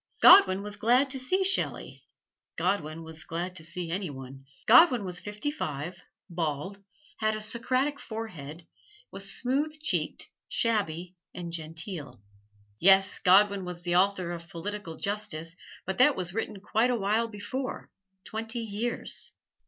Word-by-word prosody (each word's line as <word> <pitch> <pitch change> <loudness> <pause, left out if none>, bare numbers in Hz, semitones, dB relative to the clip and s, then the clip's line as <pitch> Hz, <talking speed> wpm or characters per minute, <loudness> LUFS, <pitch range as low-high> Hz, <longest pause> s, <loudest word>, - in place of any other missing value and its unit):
Godwin 200 - +8
was 210 0 -7
glad 250 +6 +3
to 265 - -3
see 370 +10 +1
Shelley 380 +1 -1 0.5
Godwin 165 -3 -1
was 160 0 -10
glad 175 +3 -4
to 160 - -10
see 170 +1 -5
any 185 0 -2
one. 135 0 -10 0.2
Godwin 250 - +7
was 180 -1 -4
fifty 210 +7 -4
five, 170 - -5 0.3
bald, 170 +4 -3 0.4
had 215 0 +1
a - - -4
Socratic 255 +6 -1
forehead, 175 -9 -7 0.5
was 195 0 -5
smooth 290 +5 -1
cheeked, 310 - -1 0.2
shabby 185 -6 -1 0.2
and 170 -2 -6
genteel. 160 - -5 0.6
Yes, 195 0 +6
Godwin 200 +1 +5
was 180 -1 -7
the 175 0 0
author 185 -1 +2
of 170 0 -7
"Political 180 0 -6
Justice" 175 -5 -2 0.3
but 190 +4 -3
that 275 +3 +6
was 180 -1 -3
written 215 -1 -3
quite 220 +4 +2
a 250 - +2
while 220 +2 +1
before, 225 +5 -5 0.3
twenty 225 +2 -4
years! 225 +2 -3
195 Hz, 140 wpm, -28 LUFS, 170-225 Hz, 0.6 s, Godwin